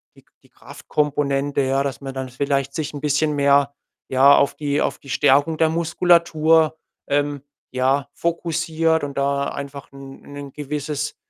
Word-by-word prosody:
die -, -, -20 dB, 0.2 s
die -, -, -24 dB
Kraftkomponente, 145 Hz, -1 st, -2 dB
ja, 135 Hz, +1 st, +1 dB
dass 140 Hz, -2 st, -4 dB
man 135 Hz, -1 st, -6 dB
dann 130 Hz, -1 st, -5 dB
vielleicht 140 Hz, +1 st, -1 dB
sich 155 Hz, -1 st, -3 dB
'n 145 Hz, -, -7 dB
bisschen 150 Hz, +1 st, +1 dB
mehr, 140 Hz, 0 st, +3 dB, 0.4 s
ja, 135 Hz, +2 st, +6 dB
auf 140 Hz, -, +2 dB
die 145 Hz, -1 st, -1 dB
auf -, -, -2 dB
die 140 Hz, -, -15 dB
Stärkung 145 Hz, +5 st, +3 dB
der 160 Hz, 0 st, +3 dB
Muskulatur, 165 Hz, -1 st, +2 dB, 0.3 s
ähm, 145 Hz, 0 st, -1 dB, 0.3 s
ja, 135 Hz, +2 st, 0 dB
fokussiert 165 Hz, -1 st, -1 dB
und 140 Hz, -1 st, -5 dB
da 140 Hz, 0 st, 0 dB
einfach 140 Hz, 0 st, -8 dB
'n 135 Hz, 0 st, -12 dB
'nen 145 Hz, -1 st, -10 dB
gewisses, 150 Hz, 0 st, -4 dB
145 Hz, 155 wpm, -21 LUFS, 140-155 Hz, 0.4 s, ja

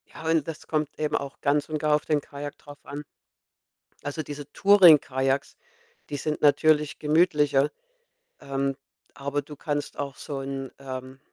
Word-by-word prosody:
Ja, 160 Hz, -, -6 dB
und 160 Hz, -3 st, +2 dB
das 160 Hz, -2 st, -7 dB
kommt 155 Hz, -2 st, 0 dB
eben 150 Hz, -1 st, 0 dB
auch 140 Hz, -1 st, -4 dB
ganz 145 Hz, +2 st, +1 dB
und 155 Hz, -, -1 dB
gar 150 Hz, 0 st, +3 dB
auf 150 Hz, -, -2 dB
den 150 Hz, -2 st, +1 dB
Kajak 145 Hz, +1 st, -8 dB
drauf 145 Hz, 0 st, -13 dB
an. 145 Hz, +1 st, -7 dB, 1.0 s
Also, 145 Hz, +2 st, -3 dB
diese 145 Hz, 0 st, -8 dB
Touring-Kajaks, 145 Hz, -9 st, +5 dB, 0.5 s
die 145 Hz, -, -3 dB
sind 150 Hz, +2 st, -3 dB
natürlich 150 Hz, 0 st, +4 dB
gemütlicher, 150 Hz, -3 st, +3 dB, 0.7 s
ähm, 135 Hz, 0 st, -2 dB, 0.4 s
aber 140 Hz, +1 st, -2 dB
du 150 Hz, +1 st, -11 dB
kannst 145 Hz, 0 st, -3 dB
auch 140 Hz, -1 st, -4 dB
so 140 Hz, -2 st, -5 dB
'n 135 Hz, 0 st, -5 dB
ähm, 130 Hz, -1 st, -7 dB
145 Hz, 155 wpm, -26 LUFS, 140-150 Hz, 1.0 s, Touring-Kajaks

